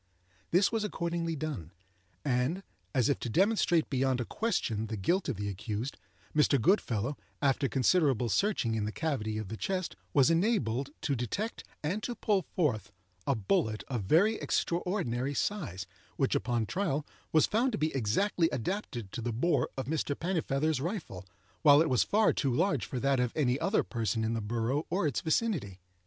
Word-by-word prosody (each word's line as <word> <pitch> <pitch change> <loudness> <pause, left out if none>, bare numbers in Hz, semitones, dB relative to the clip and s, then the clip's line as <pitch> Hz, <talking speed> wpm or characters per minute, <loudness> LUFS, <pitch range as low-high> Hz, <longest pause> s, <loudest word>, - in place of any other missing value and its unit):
This 185 +3 +4
was 225 -2 0
accordingly 170 -4 -2
done; 140 - -4 0.6
and, 135 +8 0 0.3
as 125 +2 +2
if 140 - +1
to 120 - -4
demonstrate 175 - +3
beyond 130 -1 +1
a 120 - -1
question 110 - -1
the 110 0 -4
guilt 175 - +1
of 130 - -1
the 100 0 -3
accused, 105 +6 -4 0.4
Mr. 150 -2 +4
Goodfellow, 125 - +1 0.2
after 135 -1 +2
considerable 135 - +3
searching 130 - +1
in 110 -2 -1
the 105 - -2
cavity 110 -8 -2
of 110 -3 -4
the 110 - -5
chest 185 - -2 0.2
was 140 +2 +5
enabled 150 - +1
to 140 - 0
detect 165 - -3 0.2
and 185 +8 -1
to 240 +2 -3
pull 205 -3 +1
forth 125 - 0 0.4
a 140 - +3
bullet 110 - 0
of 125 -5 -1
very 200 - +4
extraordinary 145 - -1
size, 130 - -2 0.3
which, 135 - +1
upon 120 -2 0
trial, 155 - -1 0.3
was 155 - +5
found 240 +5 +1
to 215 - -2
be 155 -4 -1
exactly 165 - +1
adapted 125 - -3
to 120 - -5
the 120 +1 -2
bore 130 +10 +1
of 130 - -2
Mr. 145 -1 -1
Pennifeather's 155 -5 0
rifle, 155 - -4 0.3
while 145 -2 +7
it 160 -3 +2
was 125 - +4
far 215 +1 +3
too 135 - 0
large 195 +11 +1
for 130 - -3
that 135 0 +2
of 125 -1 +1
any 135 -3 +1
other 190 +7 +2
person 115 -1 -1
in 110 +1 0
the 115 - -1
borough 115 +7 -1
or 180 +1 0
its 145 -6 0
vicinity. 160 - 0
140 Hz, 175 wpm, -31 LUFS, 115-175 Hz, 0.6 s, while